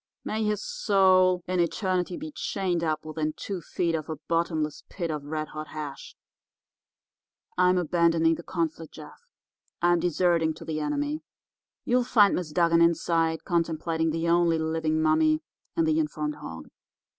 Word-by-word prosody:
May 220 +1 -2
his 210 -1 -1
soul 185 - +3
in 185 0 0
eternity 180 +1 0
be 310 +1 -7
chained 185 - -2
up 155 -1 -1
within 155 0 -2
two 195 -3 -5
feet 170 +1 -1
of 160 -1 -3
a 160 - -2
bottomless 160 -3 -1
pit 170 -4 -3
of 150 -2 -5
red 155 0 -4
hot 155 0 -7
hash. 150 -3 -7 1.4
I'm 180 0 +4
abandoning 170 -1 +3
the 165 - -5
conflict, 165 -2 -4
Jeff; 155 - -12 0.6
I'm 175 0 +3
deserting 170 -1 +1
to - - -11
the 155 -1 -3
enemy. 290 - -2 0.6
You'll 250 +1 +2
find 210 -4 +4
Miss 170 -4 -3
Dugan 170 +1 +3
inside 165 -1 +2
contemplating 165 -1 0
the 165 +1 -1
only 170 -1 +3
living 160 0 0
mummy 310 - +3 0.3
and 330 - +2
the 315 0 +2
informed 300 -1 -2
hog. - - -9
170 Hz, 150 wpm, -27 LUFS, 160-185 Hz, 1.4 s, I'm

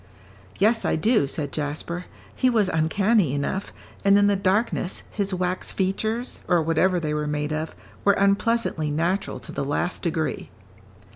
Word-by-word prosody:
"Yes, 220 +3 +3
I - - +1
do," 210 - +3
said 145 0 -3
Jasper; 155 +4 -4 0.3
"he 255 - +3
was 215 -6 +2
uncanny 175 - +2
enough, 190 +8 -2 0.3
and 200 0 +6
in 205 - +5
the 205 0 +3
darkness, 195 0 0
his 200 -2 -1
wax 185 0 -2
features, 220 +5 -1
or 175 - +4
whatever 175 +3 +2
they 155 -2 -2
were 150 0 -1
made 150 0 -2
of, 155 +1 -3 0.3
were 200 - +5
unpleasantly 200 -5 +1
natural 170 +6 -1
to - - -9
the - - -3
last 145 +6 -1
degree." 160 -2 -2
185 Hz, 155 wpm, -24 LUFS, 155-205 Hz, 0.3 s, and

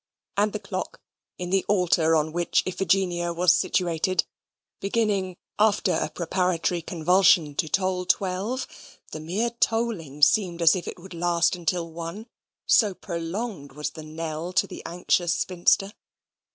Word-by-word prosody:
And 205 +1 +2
the 210 - -3
clock, 195 -2 -5 0.4
in 180 0 -5
the 195 -1 +2
altar 170 -5 +3
on 155 0 +1
which 175 0 +1
Iphigenia 180 -2 0
was 175 0 +5
situated, 175 +1 +1 0.5
beginning, 200 -3 0 0.2
after 210 -1 +3
a - - 0
preparatory 175 0 -1
convulsion, 170 -2 +3
to 160 - 0
toll 185 0 0
twelve, 195 +8 0 0.5
the 155 - -6
mere 195 +10 -1
tolling 225 - -1
seemed 175 +2 +4
as 165 0 +5
if 180 - -5
it - - -6
would 185 +1 -12
last 170 0 +1
until 170 -1 -2
one 170 +6 -7 0.4
so 205 -5 +4
prolonged 170 - -5
was 150 +1 -4
the 155 - -9
knell 160 +2 -5
to 185 - +3
the - - -9
anxious 175 0 +1
spinster. 185 +3 +1
180 Hz, 140 wpm, -25 LUFS, 165-195 Hz, 0.5 s, was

